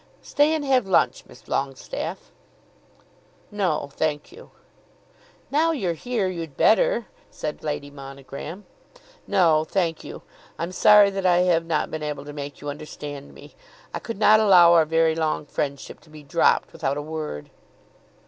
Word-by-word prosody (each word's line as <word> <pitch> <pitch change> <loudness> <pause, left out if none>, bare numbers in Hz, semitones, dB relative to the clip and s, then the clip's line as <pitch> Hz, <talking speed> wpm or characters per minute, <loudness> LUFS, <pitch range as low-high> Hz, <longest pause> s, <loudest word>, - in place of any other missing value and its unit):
Stay 295 +2 +2
and 300 -2 -3
have 260 -6 +2
lunch, 190 - +2
Miss - - -16
Longestaffe." 135 - -4 1.2
"No, 180 -8 -1
thank 150 -2 -2
you." 470 +6 -14 1.0
"Now 310 +4 +3
you're 190 - -1
here, 225 +2 -2
you'd 165 -6 -6
better," - - +3 0.2
said 150 -1 -6
Lady 145 -2 -4
Monogram. 140 +6 -9 0.6
"No, 170 -6 +3
thank 165 -1 -2
you. - - -9 0.3
I'm 170 +2 -4
sorry 205 +1 +6
that 195 -1 -1
I 175 0 +4
have 170 -2 +2
not 160 -2 -1
been 155 - -4
able 150 -2 -5
to 145 - -8
make 145 -1 -7
you 145 - -5
understand 145 -1 -8
me. - - -14 0.4
I - - -3
could 230 - -7
not 215 +1 +6
allow 180 -5 +7
our 165 -2 +5
very 160 0 +2
long 160 -2 -1
friendship 140 -1 -4
to - - -22
be 155 -1 -13
dropped 145 +4 +1
without 145 -3 -2
a - - -3
word." 155 - -6
165 Hz, 155 wpm, -24 LUFS, 145-195 Hz, 1.2 s, allow